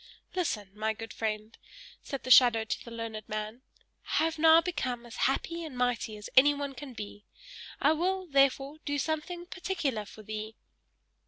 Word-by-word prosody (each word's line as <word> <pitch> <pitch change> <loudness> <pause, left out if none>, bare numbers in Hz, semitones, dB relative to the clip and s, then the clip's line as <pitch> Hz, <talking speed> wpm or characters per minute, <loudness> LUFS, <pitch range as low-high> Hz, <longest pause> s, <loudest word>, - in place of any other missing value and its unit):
"Listen, 220 - -2
my 215 +1 -1
good 225 +1 -8
friend," 215 0 -3 0.5
said 275 - -6
the 255 - -2
shadow 240 -3 +8
to 220 - -4
the - - -10
learned 230 -2 -6
man. 215 +3 -4 0.5
"I - - +3
have 325 0 -1
now 320 +1 +8
become 280 -9 -2
as 235 - -10
happy 335 +5 -2
and 300 -6 -7
mighty 245 -3 0
as 210 - -8
anyone 285 +1 +5
can 265 0 -9
be; 205 -1 -8 0.5
I 290 - +4
will, 370 +4 0
therefore, 275 0 +2
do 285 -1 -1
something 315 +4 -2
particular 335 - -2
for 215 +1 -12
thee! 215 +1 -6
255 Hz, 165 wpm, -30 LUFS, 220-310 Hz, 0.5 s, shadow